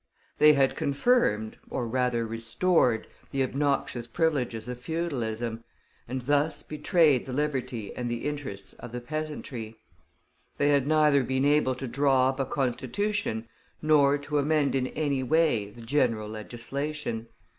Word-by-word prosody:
They 150 0 +8
had 135 -2 +2
confirmed, 140 - +1
or 120 - -2
rather 125 -1 0
restored, 115 +3 +1 0.2
the 135 -1 0
obnoxious 135 -3 -1
privileges 125 -5 -1
of 125 0 -5
feudalism, 120 -7 -3 0.4
and 130 0 -4
thus 145 +4 +1
betrayed 150 -3 +2
the 130 - -5
liberty 130 -6 -2
and 120 -1 -3
the 120 0 -3
interests 135 -10 -4
of 120 - -10
the 125 - -3
peasantry. 130 -5 -5 0.8
They 145 - +3
had 140 -2 +3
neither 150 -3 +4
been 130 +2 0
able 145 -3 +3
to 130 +1 -5
draw 135 0 +3
up 135 +1 -4
a 135 - +1
Constitution, 130 - -1 0.3
nor 145 -2 +4
to 145 +1 -1
amend 150 0 +2
in 130 -1 +1
any 145 -3 -1
way 130 -7 +2
the 115 +3 -13
general 115 -4 0
legislation. 120 +3 -4
135 Hz, 140 wpm, -28 LUFS, 120-150 Hz, 0.8 s, They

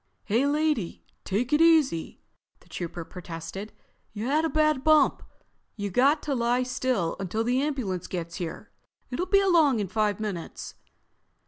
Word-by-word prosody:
"Hey, 235 +7 +1
lady, 295 - 0 0.2
take 230 +8 -1
it 300 - +4
easy!" 315 - +3 0.4
the - - -23
Trooper 170 -1 -6
protested. 180 +4 -7 0.4
"You 215 +1 -4
had 300 +5 +2
a - - 0
bad 305 -3 +2
bump. 310 -2 +4 0.5
You 205 -2 -4
got 280 - +3
to 290 - -1
lie 245 0 +1
still 255 -8 -1
until 195 +4 -2
the 250 +3 +1
ambulance 255 - -2
gets 170 -2 -5
here. 170 -3 -6 0.4
It'll 345 +9 -2
be 395 +1 +4
along 325 - +4
in 205 - -1
five 210 +1 0
minutes." 200 -6 -5
240 Hz, 150 wpm, -27 LUFS, 190-295 Hz, 0.5 s, it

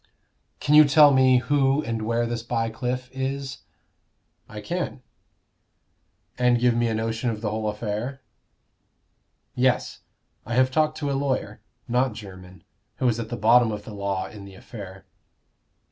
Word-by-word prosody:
"Can 145 - 0
you 155 0 +10
tell 145 0 +6
me 130 -1 +5
who 135 +2 +1
and 115 -4 -3
where 115 +2 0
this 120 -1 -3
Bycliffe 125 +2 -3
is?" 135 0 -4 0.9
"I 105 - -8
can." 140 +1 -4 0.6
" - - -46
And 125 -1 +3
give 120 0 +3
me 120 0 +1
a 110 - -1
notion 115 +2 -2
of 110 -2 -4
the 105 -2 -2
whole 110 0 -2
affair?" 110 +5 -4 1.3
"Yes; 125 0 0 0.4
I 115 - -4
have 130 0 +3
talked 155 +2 +1
to 145 -2 -2
a - - 0
lawyer 135 -1 -2 0.3
not 125 0 +1
Jermyn 95 -3 -12 0.3
who 130 - 0
is 115 -1 +1
at 115 -1 -5
the 120 - -4
bottom 115 +2 +4
of 105 -1 -5
the 110 - -10
law 100 -2 -2
in 105 -2 -10
the 100 -1 -12
affair." 95 -2 -10
120 Hz, 160 wpm, -24 LUFS, 110-130 Hz, 1.3 s, you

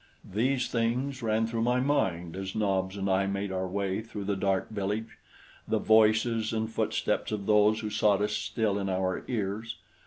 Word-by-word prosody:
These 125 +4 +1
things 125 +4 -1
ran 110 0 +1
through 115 0 -2
my 125 +2 +2
mind 90 - 0
as 95 0 -5
Nobs 95 -2 0
and 100 0 -2
I 95 0 +2
made 100 0 -2
our 95 0 -2
way 100 +1 -2
through 110 -2 -7
the 100 0 -1
dark 95 +1 0
village, 105 +2 -3 0.5
the - - +1
voices 110 +1 +3
and 110 0 -1
footsteps - - -1
of 105 -2 -3
those 105 +1 +4
who 105 -1 -4
sought 105 -1 +3
us 105 0 0
still 105 -3 -1
in 100 -1 -2
our 95 0 -1
ears. 110 0 -3
105 Hz, 180 wpm, -29 LUFS, 95-115 Hz, 0.5 s, those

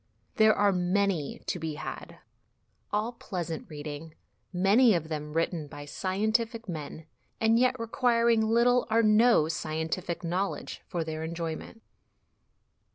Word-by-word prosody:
There 220 0 +6
are 205 0 +3
many 180 -4 0
l - - -23
to 180 - -2
be 160 -2 -4
had, - - -7 0.7
all 215 +3 0
pleasant 175 -8 -5
reading, 150 +1 -7 0.4
many 200 +5 +4
of 160 -2 -2
them 150 -1 -4
written 165 -1 -1
by 145 0 -9
scientific 220 +7 -1
men, 155 -2 -6 0.3
and 225 +1 +4
yet 255 0 +2
requiring 230 0 +2
little 235 +3 +3
or 225 +1 +3
no 215 -5 +5
scientific 160 +2 -3
knowledge 180 +4 -3
for 175 -3 -2
their 160 0 -5
enjoyment. 165 +6 -5
185 Hz, 130 wpm, -28 LUFS, 160-225 Hz, 0.7 s, There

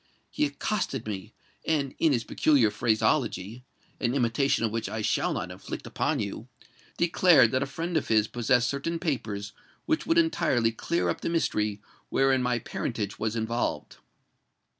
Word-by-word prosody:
He - - +1
accosted 140 - -2
me, 95 -3 -6 0.3
and, 145 -4 0
in 160 - +4
his 120 -4 +1
peculiar 130 -7 +3
phraseology—an 115 +2 -1
imitation 130 0 +2
of 110 - -1
which 115 0 -3
I 110 -1 -3
shall - - +1
not - - -3
inflict - - -7
upon - - -1
you—declared 165 -7 +1
that 130 - +1
a 135 - -1
friend 165 +5 -4
of 155 - 0
his 110 -1 +3
possessed 125 +1 +2
certain 140 +6 -2
papers 105 - -3 0.3
which 315 - 0
would 330 +1 +3
entirely 130 - +2
clear 170 +9 -1
up - - -2
the - - -2
mystery 105 -11 0 0.3
wherein 135 -1 +3
my 125 -1 +1
parentage 110 -2 -4
was 110 +1 -1
involved. 115 +1 -2
125 Hz, 150 wpm, -27 LUFS, 110-150 Hz, 0.3 s, in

